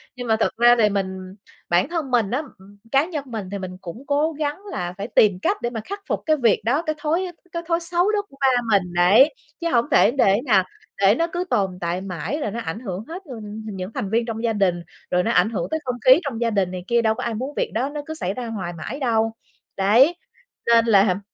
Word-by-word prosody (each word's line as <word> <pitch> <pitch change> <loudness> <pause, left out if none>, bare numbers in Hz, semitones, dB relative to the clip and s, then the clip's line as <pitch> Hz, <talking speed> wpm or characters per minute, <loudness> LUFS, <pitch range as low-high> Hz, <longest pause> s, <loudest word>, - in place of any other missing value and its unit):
Nhưng 245 -1 -6
mà 220 - +3
thật - - +1
ra 240 +1 +6
thì 210 -2 +5
mình 190 -2 -2 0.5
bản 175 +9 +2
thân 325 -6 -3
mình 230 -5 +2
đó, 255 +6 0 0.2
ừm, 200 +2 -17
cá 275 +2 +4
nhân 320 -5 -4
mình 220 -6 -5
thì 200 - -3
mình 185 -1 -7
cũng 190 +8 -8
cố 295 +3 +1
gắng 295 -1 -3
là 175 0 -3
phải 200 +1 -4
tìm 205 -6 +3
cách 405 - +1
để 240 - -1
mà 230 -2 -5
khắc 400 +1 -5
phục - - -1
cái 310 - +3
việc 235 -6 +3
đó, 270 +7 +2
cái 310 -2 -2
thói 320 +5 0 0.2
cái 335 0 -4
thói 335 -1 +1
xấu 350 +3 +1
đó 420 -1 +1
của 275 - -19
ba 270 - +4 0.3
mình, 180 -2 -5
đấy, 205 - +5 0.3
chứ 335 - 0
hổng 235 -6 +2
thể - - +5
để 220 -7 +3
nè 205 -8 +4 0.4
để 200 +2 +5
nó 335 +6 +1
cứ 350 0 -1
tồn 190 -3 0
tại 175 +1 -2
mãi, 195 - -4
rồi 210 - -2
nó 230 - -4
ảnh 165 -1 -4
hưởng 195 -4 -5
hết 345 +4 -7
luôn 220 -4 -7
những 190 -2 -6
thành 195 - -3
viên 230 +3 +1
trong 225 -1 -5
gia 230 -1 +1
đình. 185 -4 +1 0.3
Rồi 180 0 +2
nó 230 - 0
ảnh 220 - +3
hưởng 225 - -3
tới 315 - 0
không 250 -1 -2
khí 260 +4 +8
trong 260 -6 -4
gia 235 - +2
đình 195 -4 0
này 180 -1 -6
kia, 235 0 +3
đâu 220 -1 +2
có - - -5
ai 235 - -2
muốn 260 +6 -4
việc - - -1
đó 245 +6 0
nó 295 0 -5
cứ 315 - -5
xảy 195 - -3
ra 250 +2 -5
hoài 190 -6 -4
mãi 220 - -6
đâu. 225 -4 +1 0.5
Đấy, 230 - +5 0.5
nên 230 -1 +5
làm 200 -4 +4
230 Hz, 255 wpm, -22 LUFS, 195-285 Hz, 0.5 s, khí